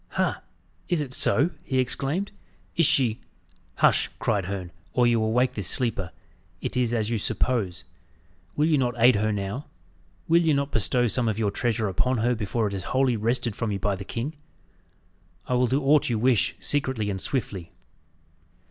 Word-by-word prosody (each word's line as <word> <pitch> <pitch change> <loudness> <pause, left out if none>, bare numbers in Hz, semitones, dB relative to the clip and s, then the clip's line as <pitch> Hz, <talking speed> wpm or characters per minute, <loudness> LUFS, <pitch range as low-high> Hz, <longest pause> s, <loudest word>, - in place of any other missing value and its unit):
"Ha! - - 0 0.5
is 175 - +1
it 140 -4 -4
so?" 145 +6 +3
he 130 - -2
exclaimed. 135 +9 -1 0.4
"Is 165 -4 +4
she 130 -8 +2 0.3
" - - -36
"Hush!" - - +5
cried 100 -4 0
Herne, 95 -2 -5 0.2
"or 125 - +3
you 120 -1 +3
will 110 0 0
wake 125 +2 +2
this 100 -8 -2
sleeper. 105 -7 +1 0.5
It - - -4
is 125 -2 +1
as 115 -1 0
you 115 - 0
suppose. 100 -5 -1 0.7
Will 150 - +2
you 155 -3 +3
not 120 -2 0
aid 120 +2 +6
her 110 +1 +1
now? 105 +7 -3 0.6
Will 170 +1 +5
you 160 -3 +2
not 140 +1 -1
bestow 120 +3 +1
some 120 +1 0
of 110 -2 -1
your 105 -3 0
treasure 115 -2 0
upon 125 +7 0
her 120 +2 +2
before 110 0 -1
it 100 - -5
is 95 -3 -5
wholly 130 -2 +1
wrested 115 0 -1
from 115 -3 -2
you 100 - -1
by 100 0 -1
the 95 - -7
king? 120 +9 -4 1.1
I - - -1
will 125 0 +3
do 135 +4 0
aught 145 0 +4
you 115 - 0
wish, 120 0 +2
secretly 130 -7 0
and 95 -1 -4
swiftly." 100 -10 -3
120 Hz, 185 wpm, -25 LUFS, 105-130 Hz, 1.1 s, aid